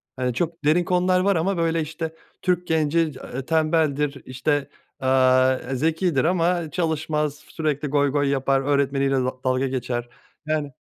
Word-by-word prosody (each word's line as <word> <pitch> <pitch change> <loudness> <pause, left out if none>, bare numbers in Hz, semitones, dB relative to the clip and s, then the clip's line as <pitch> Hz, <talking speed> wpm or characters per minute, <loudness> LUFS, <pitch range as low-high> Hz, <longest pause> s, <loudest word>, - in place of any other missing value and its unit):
Hani, 125 -2 -1
çok 165 +5 -3
derin 160 +4 +4
konular 180 +1 +2
var 195 +2 +2
ama, 180 +3 0
böyle, 165 -1 +1
işte, 160 +1 -5 0.3
Türk 180 -1 0
genci, 160 0 +1
eee, 135 -4 -3
tembeldir, 155 -3 +1
işte, 140 +2 -1 0.3
aaa, 130 0 +4 0.2
zekidir 160 +1 +1
ama 170 -2 +1
çalışmaz, 155 -3 -1
sürekli 150 -1 -3
goy 145 0 +2
goy 145 0 +1
yapar, 135 0 +1
öğretmeniyle 140 -1 +1
da 130 -1 0
dalga 130 +1 +1
geçer. 125 -2 -3 0.4
Yani 155 -2 -2
150 Hz, 145 wpm, -23 LUFS, 135-165 Hz, 0.4 s, derin